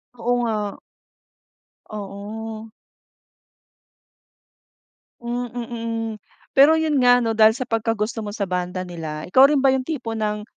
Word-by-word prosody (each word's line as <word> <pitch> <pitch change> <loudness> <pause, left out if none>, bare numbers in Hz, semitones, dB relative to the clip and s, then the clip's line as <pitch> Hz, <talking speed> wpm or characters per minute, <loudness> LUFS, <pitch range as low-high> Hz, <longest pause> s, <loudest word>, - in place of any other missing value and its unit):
Oo 245 +1 -1
nga. 215 -3 -2 1.1
Oo. 215 +2 -7 2.5
Mm, 240 +1 -3
mm. 230 -1 -4 0.4
Pero 290 +4 +6
yun 315 -2 +1
nga 245 0 +6
'no, 225 -1 0
dahil 220 0 +6
sa 255 - -3
pagkagusto 225 0 -1
mo 210 - -5
sa 205 -2 -2
banda 180 0 -3
nila, 160 -3 -6
ikaw 260 +9 +6
rin 295 - +2
ba 270 -1 +4
yung 265 - +1
tipo 255 -8 -4
ng 210 -1 -2
225 Hz, 125 wpm, -22 LUFS, 210-245 Hz, 2.5 s, Pero